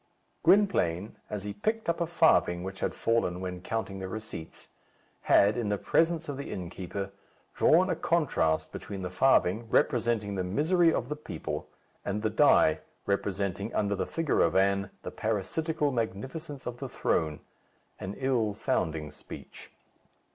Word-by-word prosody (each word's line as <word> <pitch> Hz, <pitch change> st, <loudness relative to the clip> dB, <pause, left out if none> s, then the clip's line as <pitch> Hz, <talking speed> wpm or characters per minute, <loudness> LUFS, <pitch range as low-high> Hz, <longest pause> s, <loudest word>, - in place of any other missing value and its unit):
Gwynplaine, 105 Hz, -, +3 dB
as 105 Hz, -2 st, -4 dB
he 105 Hz, 0 st, -4 dB
picked 220 Hz, -, -2 dB
up 170 Hz, +1 st, 0 dB
a 170 Hz, -, +1 dB
farthing 160 Hz, -, +3 dB
which 95 Hz, +1 st, -6 dB
had -, -, -1 dB
fallen 115 Hz, -6 st, +1 dB
when 90 Hz, -1 st, -5 dB
counting 110 Hz, -2 st, -3 dB
the 95 Hz, -, -4 dB
receipts, 110 Hz, -5 st, -8 dB, 0.6 s
had, 105 Hz, +2 st, +6 dB
in 115 Hz, -4 st, -1 dB
the 105 Hz, -, +1 dB
presence 165 Hz, -, +1 dB
of 145 Hz, -2 st, -4 dB
the 140 Hz, -, -6 dB
innkeeper, 95 Hz, +2 st, -5 dB, 0.4 s
drawn 180 Hz, +4 st, +5 dB
a -, -, 0 dB
contrast 150 Hz, -, +1 dB
between 95 Hz, -2 st, -6 dB
the 90 Hz, -, -4 dB
farthing, 110 Hz, 0 st, +3 dB
representing 115 Hz, -6 st, +2 dB
the 95 Hz, -2 st, -1 dB
misery 165 Hz, -, +3 dB
of 120 Hz, -, -1 dB
the 150 Hz, -, -3 dB
people, 150 Hz, -, -5 dB, 0.4 s
and 105 Hz, +2 st, -2 dB
the 110 Hz, -, +1 dB
die, -, -, +5 dB, 0.3 s
representing, 100 Hz, +1 st, -1 dB
under 100 Hz, -1 st, +1 dB
the 95 Hz, -, -2 dB
figure 165 Hz, -3 st, +1 dB
of 85 Hz, -, +3 dB
Anne, 100 Hz, +1 st, +3 dB
the -, -, -5 dB
parasitical 145 Hz, -, -1 dB
magnificence 130 Hz, -, -4 dB
of 120 Hz, 0 st, -5 dB
the -, -, -5 dB
throne 75 Hz, -2 st, 0 dB, 0.6 s
an 95 Hz, +2 st, -5 dB
ill 120 Hz, -6 st, +1 dB
sounding 80 Hz, -5 st, -1 dB
speech. 75 Hz, -, -11 dB
105 Hz, 155 wpm, -29 LUFS, 95-145 Hz, 0.6 s, had